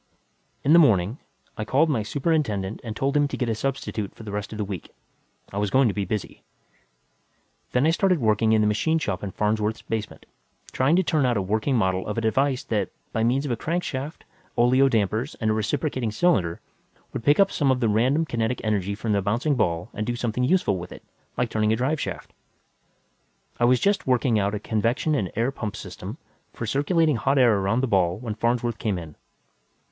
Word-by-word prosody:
In 145 - +4
the 170 - +8
morning, 110 - +3 0.4
I - - 0
called 140 +8 +3
my 135 -8 0
superintendent 110 - -1
and 110 -3 -5
told 135 +2 -1
him 145 -1 +3
to - - -5
get 125 -3 -1
a - - +1
substitute 110 -4 -3
for - - -11
the 105 - -7
rest 105 0 -4
of 110 - -6
the 105 - -2
week; 95 -5 -6 0.6
I 100 - -2
was 105 -1 0
going 130 +4 +4
to - - -2
be 100 -1 -2
busy. 105 +1 -4 1.3
Then 125 +3 +2
I 160 - +4
started 185 +1 +2
working 110 -1 +2
in 110 -1 +4
the 105 - +3
machine 160 +10 +1
shop 100 - -2
in 100 - -3
Farnsworth's 105 +2 -1
basement, 110 -2 -5 0.5
trying 135 +6 +2
to 185 - +3
turn 155 -4 +1
out 125 -3 +2
a - - +1
working 110 +8 0
model 95 -4 0
of 105 - -3
a - - +1
device 130 +4 +1
that, 105 -5 -1 0.2
by 110 - 0
means 130 +5 +1
of 140 - -2
a - - +1
crankshaft, 155 0 -3 0.3
oleo 130 +3 +4
dampers 110 +3 0
and 110 -2 +1
a - - +2
reciprocating 125 +3 -1
cylinder, 100 - +1 0.5
would - - -4
pick 145 - +4
up 195 0 +5
some 145 -3 +1
of 130 -1 +2
that 120 - +1
random 125 +9 +2
kinetic 120 -3 -1
energy 100 -2 0
from 110 +1 -3
the 100 -1 +2
bouncing 115 +10 0
ball 90 -6 0
and 105 +1 -4
do 120 - -1
something 120 +1 -2
useful 125 - +2
with 90 +1 -8
it, - - -11 0.3
like 125 -2 0
turning 110 0 +1
a - - +3
drive 135 +6 0
shaft. - - -6 1.3
I 120 - +4
was 125 +1 +4
just 200 -5 +1
working 125 -3 +2
out 100 +1 0
a - - -3
convection 115 +9 0
and 100 - -1
air 115 +4 +1
pump 110 -7 -5
system - - -8 0.4
for 115 - -5
circulating 145 - +2
hot 135 +5 +1
air 120 -6 +5
around 100 +6 +1
the 135 - 0
ball 95 -4 +2
when 110 -1 -5
Farnsworth 120 +1 -1
came 105 -4 -1
in. 80 -4 -8
115 Hz, 210 wpm, -24 LUFS, 105-135 Hz, 1.3 s, the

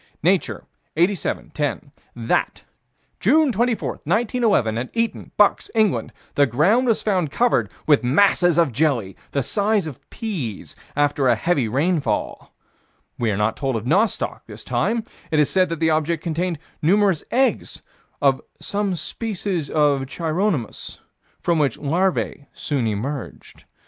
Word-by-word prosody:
Nature, - - +1 0.3
87 180 +3 0
10: 145 -1 -3 0.2
That, 115 -1 -1 0.6
June 295 - +4
24, 235 +1 -1
1911, 210 - +1
at 125 - -4
Eton, 230 -1 -2
Bucks, 205 -1 +3
England, 215 -4 +1 0.2
the 145 -1 +4
ground 185 - +3
was 225 - +2
found 185 -7 +1
covered 140 - +1
with 145 -4 +4
masses 175 +5 +3
of 165 -5 +3
jelly, 120 -7 0
the 140 - -1
size 205 - +1
of 150 -6 -7
peas, 160 - -5 0.2
after 145 -2 +2
a 120 - +5
heavy 140 0 0
rainfall. 140 - -1 0.7
We 115 - +1
are 100 - 0
not 105 +1 +1
told 135 -3 -2
of 110 0 -3
nostoc, 195 - +1
this - - -10
time: 230 0 0 0.3
it 155 - 0
is 150 -2 +3
said 185 -2 +3
that 165 -2 -4
the 160 -1 +2
object 155 +1 0
contained 170 +1 -1 0.2
numerous 190 0 +3
eggs 260 +1 0 0.4
of 135 -2 +3 0.2
"some 200 -2 -1
species 190 -5 -3
of 145 -3 +2
Chironomus, 165 - -2 0.4
from 170 -2 +1
which 145 -3 +1
larvae 160 -1 -1
soon 135 -6 -1
emerged." 120 +6 -5
160 Hz, 140 wpm, -22 LUFS, 135-200 Hz, 0.7 s, a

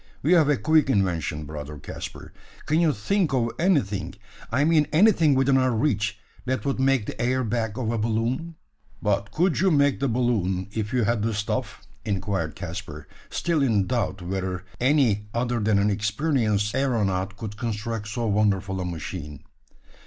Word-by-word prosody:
You 165 +6 +5
have 155 -4 +4
a 145 - +3
quick 155 +6 +3
invention, 85 - 0
brother 75 0 -7
Caspar; 65 - -8 0.3
can 155 +2 +2
you 165 -3 +4
think 155 - 0
of 115 -2 +1
anything 130 - +1 0.4
I 135 +5 +2
mean 155 -1 +3
anything 165 -4 +5
within 135 0 +3
our 130 -1 +3
reach 110 -4 0 0.3
that 130 +2 -1
would 140 -1 -1
make 135 -4 +2
the - - -5
air 130 +2 +1
bag 110 -1 -2
of 115 -3 -1
a 115 - -1
balloon?" 115 +9 -1 0.4
"But 100 -1 0
could 165 - +1
you 190 +3 +4
make 145 -4 +3
the 140 - +1
balloon, 105 -6 0
if 110 -1 -3
you 125 -2 +1
had 110 +1 +1
the 110 0 -1
stuff?" 105 0 -3 0.2
inquired 95 -6 -2
Caspar, - - -7 0.2
still 170 -3 0
in 110 -8 +2
doubt 105 -5 -2
whether 95 0 -3
any 125 -6 +2
other 120 0 0
than 105 -1 +2
an 100 +1 +2
experienced 105 -1 0
aeronaut 105 -7 0
could 105 -1 -6
construct 110 -1 -3
so 115 +2 -3
wonderful 100 -3 +1
a - - -3
machine. 80 -3 -6
115 Hz, 165 wpm, -25 LUFS, 100-135 Hz, 0.4 s, You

